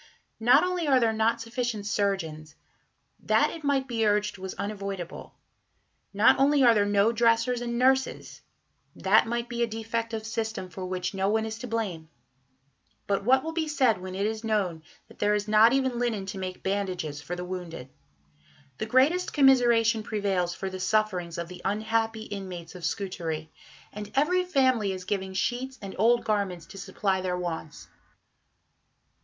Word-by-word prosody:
Not 245 Hz, +7 st, +5 dB
only 360 Hz, -3 st, -1 dB
are 265 Hz, -2 st, +5 dB
there 230 Hz, -2 st, +2 dB
not 220 Hz, +1 st, +1 dB
sufficient 230 Hz, -2 st, -3 dB
surgeons 180 Hz, -8 st, -2 dB, 0.6 s
that, -, -, +2 dB
it 325 Hz, -, -9 dB
might 275 Hz, -2 st, +1 dB
be 230 Hz, -3 st, -1 dB
urged, 210 Hz, -1 st, +1 dB
was 190 Hz, 0 st, -6 dB
unavoidable; 195 Hz, -4 st, -6 dB, 0.8 s
not 210 Hz, +5 st, +4 dB
only 280 Hz, 0 st, +4 dB
are 240 Hz, -2 st, +7 dB
there 205 Hz, -2 st, +2 dB
no 205 Hz, +2 st, +3 dB
dressers 235 Hz, +1 st, +2 dB
and 235 Hz, 0 st, -3 dB
nurses 265 Hz, +1 st, +1 dB, 0.5 s
that 215 Hz, +4 st, +3 dB
might 235 Hz, +1 st, -2 dB
be 240 Hz, 0 st, -4 dB
a 235 Hz, -, +3 dB
defect 225 Hz, +1 st, -3 dB
of 220 Hz, 0 st, -5 dB
system 220 Hz, -4 st, -3 dB
for 185 Hz, +2 st, -6 dB
which 180 Hz, 0 st, -3 dB
no 195 Hz, 0 st, 0 dB
one 220 Hz, +1 st, +1 dB
is 220 Hz, 0 st, -5 dB
to 250 Hz, -, -6 dB
blame; 195 Hz, -9 st, -3 dB, 1.0 s
but 200 Hz, 0 st, 0 dB
what 260 Hz, +4 st, +4 dB
will 320 Hz, -, -3 dB
be 325 Hz, -1 st, -2 dB
said 255 Hz, -10 st, +2 dB
when 185 Hz, 0 st, -6 dB
it 200 Hz, +1 st, -1 dB
is 220 Hz, +1 st, -3 dB
known 200 Hz, -7 st, -1 dB, 0.3 s
that -, -, -18 dB
there 210 Hz, 0 st, +2 dB
is 205 Hz, 0 st, -2 dB
not 215 Hz, +2 st, +6 dB
even 260 Hz, -2 st, +1 dB
linen 225 Hz, -5 st, -1 dB
to 190 Hz, 0 st, -6 dB
make 185 Hz, -1 st, -6 dB
bandages 185 Hz, -7 st, -2 dB
for 175 Hz, +3 st, -5 dB
the 180 Hz, 0 st, -5 dB
wounded? 175 Hz, -7 st, -6 dB, 0.9 s
The 215 Hz, -, -2 dB
greatest 285 Hz, +10 st, +3 dB
commiseration 240 Hz, -5 st, +4 dB
prevails 195 Hz, -5 st, -1 dB
for 190 Hz, -1 st, -4 dB
the 185 Hz, -, -6 dB
sufferings 185 Hz, -4 st, 0 dB
of 170 Hz, 0 st, -4 dB
the 180 Hz, +1 st, -10 dB
unhappy 220 Hz, +2 st, -1 dB
inmates 185 Hz, -5 st, -7 dB
of 180 Hz, -3 st, -7 dB
Scutari, 165 Hz, -4 st, -3 dB, 0.4 s
and 210 Hz, 0 st, -7 dB
every 360 Hz, +6 st, +2 dB
family 255 Hz, -, +2 dB
is 185 Hz, -1 st, -7 dB
giving 190 Hz, -1 st, -3 dB
sheets 255 Hz, +6 st, -2 dB
and 195 Hz, -2 st, -7 dB
old 235 Hz, +3 st, +3 dB
garments 200 Hz, -5 st, -1 dB
to 195 Hz, -, -11 dB
supply 190 Hz, 0 st, -1 dB
their 180 Hz, -1 st, -2 dB
wants. 165 Hz, -4 st, -5 dB
215 Hz, 170 wpm, -27 LUFS, 190-235 Hz, 1.0 s, are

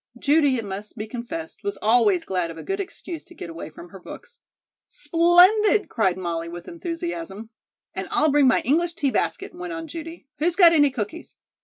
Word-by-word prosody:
Judy, 285 Hz, 0 st, +3 dB
it 225 Hz, -, -4 dB
must 200 Hz, +3 st, -7 dB
be 215 Hz, -, -4 dB
confessed, 250 Hz, +9 st, -7 dB
was 405 Hz, 0 st, -3 dB
always 215 Hz, -5 st, +3 dB
glad 180 Hz, -3 st, -1 dB
of 165 Hz, -, -9 dB
a -, -, -8 dB
good 390 Hz, +1 st, -3 dB
excuse 360 Hz, -4 st, -6 dB
to 345 Hz, -, -16 dB
get 170 Hz, -, -7 dB
away 165 Hz, -1 st, -7 dB
from 170 Hz, +3 st, -13 dB
her 195 Hz, -, -12 dB
books. 480 Hz, -, -11 dB, 0.5 s
"Splendid!" 375 Hz, 0 st, +4 dB
cried 190 Hz, -6 st, +1 dB
Molly 170 Hz, -2 st, -3 dB
with 175 Hz, 0 st, -9 dB
enthusiasm. 335 Hz, -, -6 dB, 0.4 s
"And -, -, -4 dB
I'll 310 Hz, -, +2 dB
bring 285 Hz, -1 st, +4 dB
my 255 Hz, -, +4 dB
English 335 Hz, +7 st, +1 dB
tea 280 Hz, -5 st, 0 dB
basket," -, -, -2 dB
went 350 Hz, 0 st, -6 dB
on 325 Hz, -1 st, -5 dB
Judy. 330 Hz, +1 st, -8 dB
"Who's 335 Hz, +3 st, +1 dB
got 350 Hz, -3 st, +7 dB
any 290 Hz, -3 st, +5 dB
cookies?" 255 Hz, +6 st, -6 dB
295 Hz, 190 wpm, -23 LUFS, 210-340 Hz, 0.5 s, got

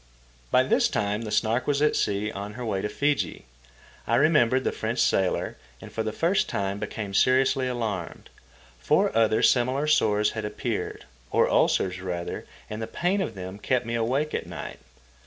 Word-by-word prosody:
By -, -, +4 dB
this -, -, +3 dB
time 105 Hz, +2 st, -1 dB
the 110 Hz, -2 st, -5 dB
Snark 120 Hz, +4 st, +1 dB
was 145 Hz, -1 st, +2 dB
at 150 Hz, 0 st, +3 dB
sea 105 Hz, +1 st, 0 dB
on 100 Hz, +1 st, -6 dB
her 120 Hz, +2 st, -6 dB
way 100 Hz, -4 st, -1 dB
to 105 Hz, -, -2 dB
Fiji. 145 Hz, -, -1 dB, 0.6 s
I -, -, +2 dB
remembered 130 Hz, -5 st, +4 dB
the -, -, 0 dB
French 115 Hz, +2 st, -3 dB
sailor, 95 Hz, -5 st, +1 dB, 0.2 s
and -, -, -11 dB
for 110 Hz, -, -2 dB
the 110 Hz, -1 st, -2 dB
first 170 Hz, -, +1 dB
time 100 Hz, 0 st, -2 dB
became 105 Hz, -1 st, -5 dB
seriously 130 Hz, +4 st, +3 dB
alarmed. 110 Hz, -8 st, -4 dB, 0.5 s
Four 65 Hz, -, +2 dB
other 110 Hz, -1 st, +3 dB
similar 130 Hz, +3 st, +3 dB
sores 105 Hz, -9 st, +3 dB
had 110 Hz, -, -5 dB
appeared—or 60 Hz, -11 st, -2 dB
ulcers, 90 Hz, -1 st, +2 dB
rather, 90 Hz, -2 st, -4 dB, 0.2 s
and 110 Hz, +1 st, -6 dB
the 110 Hz, -, -3 dB
pain 185 Hz, +3 st, 0 dB
of -, -, -3 dB
them 95 Hz, +1 st, -7 dB
kept 125 Hz, +3 st, 0 dB
me 115 Hz, -, -4 dB
awake 130 Hz, +7 st, 0 dB
at -, -, -3 dB
night. -, -, -7 dB
110 Hz, 175 wpm, -26 LUFS, 100-130 Hz, 0.6 s, By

